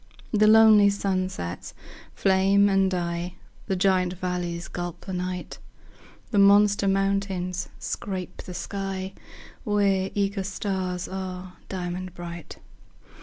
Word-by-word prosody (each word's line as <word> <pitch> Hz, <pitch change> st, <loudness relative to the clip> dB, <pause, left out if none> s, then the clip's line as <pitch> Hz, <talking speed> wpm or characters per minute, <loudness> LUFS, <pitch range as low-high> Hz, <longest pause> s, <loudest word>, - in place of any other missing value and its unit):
The 215 Hz, -1 st, +4 dB
lonely 215 Hz, -2 st, +7 dB
sunsets 185 Hz, -, -3 dB, 0.4 s
flame 195 Hz, +1 st, +4 dB
and 195 Hz, -1 st, +3 dB
die; 175 Hz, 0 st, -3 dB, 0.3 s
The 190 Hz, -, 0 dB
giant 185 Hz, -1 st, +2 dB
valleys 180 Hz, -2 st, -3 dB
gulp 175 Hz, -1 st, -5 dB
the 190 Hz, -, -5 dB
night; 180 Hz, 0 st, -4 dB, 0.7 s
The 205 Hz, -, +3 dB
monster 200 Hz, 0 st, +5 dB
mountains 195 Hz, -2 st, 0 dB
scrape 185 Hz, -2 st, -5 dB
the 180 Hz, -, -8 dB
sky, 195 Hz, 0 st, -4 dB, 0.5 s
Where 200 Hz, -3 st, +1 dB
eager 200 Hz, -1 st, 0 dB
stars 190 Hz, -2 st, -3 dB
are 185 Hz, -1 st, -6 dB, 0.2 s
diamond 180 Hz, -1 st, -4 dB
bright. 170 Hz, -1 st, -8 dB
190 Hz, 110 wpm, -25 LUFS, 180-200 Hz, 0.7 s, lonely